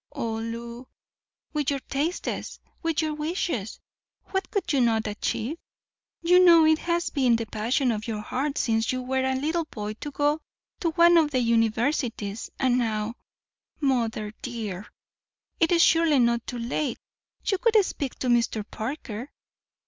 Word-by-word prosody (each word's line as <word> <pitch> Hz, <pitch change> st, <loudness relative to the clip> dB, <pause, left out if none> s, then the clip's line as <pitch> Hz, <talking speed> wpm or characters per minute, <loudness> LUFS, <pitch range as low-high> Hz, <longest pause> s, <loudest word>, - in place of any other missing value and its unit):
Oh, 225 Hz, -1 st, -2 dB
Lew, 235 Hz, +2 st, -6 dB, 0.7 s
with 295 Hz, -3 st, 0 dB
your 280 Hz, -, 0 dB
tastes, 300 Hz, +8 st, -3 dB, 0.2 s
with 330 Hz, -1 st, 0 dB
your 310 Hz, -1 st, -1 dB
wishes, 300 Hz, -, -3 dB, 0.5 s
what 385 Hz, -2 st, -1 dB
could 350 Hz, -5 st, -1 dB
you 275 Hz, -, +3 dB
not 225 Hz, -2 st, +2 dB
achieve? 220 Hz, +7 st, -2 dB, 0.7 s
You 360 Hz, +2 st, +6 dB
know 335 Hz, -3 st, +8 dB
it 315 Hz, 0 st, +4 dB
has 345 Hz, 0 st, -1 dB
been 255 Hz, -5 st, +3 dB
the 230 Hz, 0 st, -2 dB
passion 235 Hz, +5 st, 0 dB
of 215 Hz, 0 st, -4 dB
your 215 Hz, -2 st, -3 dB
heart 275 Hz, +6 st, -2 dB
since 225 Hz, -1 st, +1 dB
you 255 Hz, 0 st, -3 dB
were 260 Hz, +1 st, 0 dB
a 265 Hz, 0 st, +1 dB
little 315 Hz, +5 st, -1 dB
boy 210 Hz, -7 st, -5 dB
to 295 Hz, -, -5 dB
go 290 Hz, +2 st, 0 dB, 0.4 s
to 335 Hz, -, +1 dB
one 340 Hz, +1 st, +6 dB
of 315 Hz, -3 st, +4 dB
the 265 Hz, -3 st, +1 dB
universities, 230 Hz, -2 st, 0 dB
and 255 Hz, -2 st, +3 dB
now—— 220 Hz, -1 st, -1 dB, 0.7 s
Mother, 230 Hz, -6 st, 0 dB
dear, 210 Hz, -5 st, -5 dB, 0.7 s
it 330 Hz, 0 st, +3 dB
is 340 Hz, -1 st, +5 dB
surely 325 Hz, -3 st, +4 dB
not 235 Hz, -2 st, +2 dB
too 245 Hz, -, -4 dB
late; 245 Hz, +3 st, -2 dB, 0.5 s
you 390 Hz, -, +1 dB
could 460 Hz, 0 st, +2 dB
speak 275 Hz, -7 st, -4 dB
to 255 Hz, -, -4 dB
Mr. 230 Hz, -3 st, +2 dB
Parker. 240 Hz, 0 st, -5 dB
255 Hz, 155 wpm, -26 LUFS, 230-310 Hz, 0.7 s, know